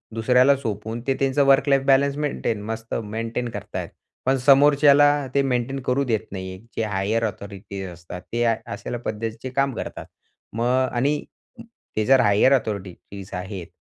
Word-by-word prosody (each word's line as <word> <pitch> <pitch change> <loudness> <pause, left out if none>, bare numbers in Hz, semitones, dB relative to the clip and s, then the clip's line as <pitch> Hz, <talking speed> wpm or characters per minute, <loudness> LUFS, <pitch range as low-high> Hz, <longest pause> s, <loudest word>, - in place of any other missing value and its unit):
दुसऱ्याला 125 +4 +4
सोपवून 110 -1 -4
ते 135 - +3
त्यांचं 135 +1 +2
वर्क 135 +1 +4
लाईफ 135 -1 +4
बॅलन्स 140 +1 +3
मेंटेन 125 -7 -2
मस्त 115 0 -5
मेंटेन 115 +3 -4
करतायत. - - -6 0.4
पण 135 +1 +3
समोरच्याला 145 +1 +5
ते 140 - +3
मेंटेन 135 0 -1
करू 135 +2 +1
देत 115 -5 0
नाही. 95 -1 -6 0.2
जे 115 - -1
हायर 105 +3 0
अथॉरिटीज 100 -2 -6
असतात. 90 +1 -9
ते 120 - +1
अशा 115 +1 -2
पद्धतीचे 115 +3 -4
काम 135 +1 0
करतात. - - -6 0.5
मग 125 +3 +1
आणि 140 +5 0 0.7
ते 110 - +1
जर 135 +2 +5
हायर 105 +6 +4
अथॉरिटीज 100 -4 -4
आहेत, 90 -1 -6
120 Hz, 150 wpm, -23 LUFS, 105-135 Hz, 0.7 s, समोरच्याला